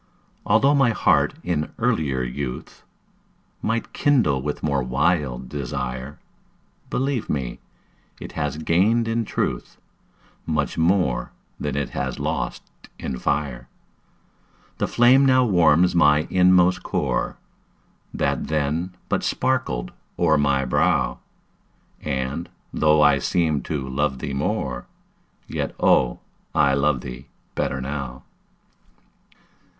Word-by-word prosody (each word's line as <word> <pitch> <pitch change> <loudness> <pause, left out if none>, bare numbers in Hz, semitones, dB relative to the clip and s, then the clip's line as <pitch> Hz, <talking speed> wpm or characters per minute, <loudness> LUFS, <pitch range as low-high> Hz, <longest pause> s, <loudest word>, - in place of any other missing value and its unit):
Altho' 125 +7 +4
my 135 -4 +4
heart 115 - +2
in 75 -4 -2
earlier 65 -5 0
youth 60 +1 -5 0.8
Might 115 +1 -2
kindle 120 - +2
with 75 +2 -4
more 70 -3 +1
wild 65 -1 0
desire, 65 0 -5 0.7
Believe 135 -3 -1
me, 60 -4 -3 0.6
it - - -8
has 75 +1 -3
gained 100 +9 +2
in 115 0 0
truth - - -3 0.7
Much 75 -3 -1
more 85 -5 +1 0.3
than - - -3
it 70 -3 -2
has 65 -1 -3
lost - - -3 0.3
in 65 -2 -5
fire. 70 -5 -2 1.1
The - - +1
flame 125 +3 +5
now 130 -2 +5
warms 90 -4 +4
my 75 -2 +4
inmost 90 0 +4
core, 65 -1 -1 0.7
That - - -1
then 80 +4 -1
but - - 0
sparkled - - -1 0.3
o'er 80 -3 +3
my 70 -2 +2
brow, 60 - +1 0.8
And, 70 +3 -3 0.2
though 75 0 +4
I 75 -1 +5
seemed 80 -6 0
to 70 -4 -3
love 65 +1 -1
thee 70 - -5
more, 65 -2 -2 0.6
Yet, - - -3
oh, 60 -2 +3 0.3
I 70 -2 +4
love 70 -1 +1
thee 60 +1 -8 0.3
better 65 - -1
now. 65 -1 -5
75 Hz, 115 wpm, -23 LUFS, 65-90 Hz, 1.1 s, flame